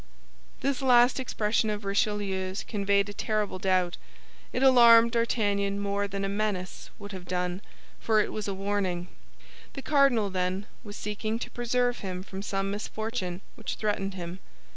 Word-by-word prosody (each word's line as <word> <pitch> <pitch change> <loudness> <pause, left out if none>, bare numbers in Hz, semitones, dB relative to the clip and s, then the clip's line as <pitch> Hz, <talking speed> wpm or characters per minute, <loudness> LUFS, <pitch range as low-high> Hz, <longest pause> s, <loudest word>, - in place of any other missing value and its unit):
This 275 0 0
last 250 0 +5
expression 220 -3 0
of 210 -1 -3
Richelieu's 195 -2 -1
conveyed 200 -1 +1
a - - -6
terrible 210 -3 -1
doubt; 185 -2 +1 0.5
it 260 - -1
alarmed 235 -3 +8
D'Artagnan 205 -4 0
more 200 0 -1
than 195 0 -3
a - - 0
menace 200 -2 -3
would 205 0 -9
have 185 -2 -8
done, 180 +1 -2 0.4
for 220 -1 +2
it 210 - 0
was 215 -1 -3
a 200 - -1
warning. 190 -3 -2 0.6
The 275 - -7
cardinal, 275 -9 +3
then, 185 +2 -1 0.2
was 205 -1 -9
seeking 215 +2 -3
to - - -6
preserve 245 0 0
him 185 -2 -5
from 190 0 -7
some 195 -1 -2
misfortune 210 -3 -4
which 225 - -5
threatened 200 -2 -2
him. 175 0 -6
205 Hz, 155 wpm, -28 LUFS, 190-225 Hz, 0.6 s, alarmed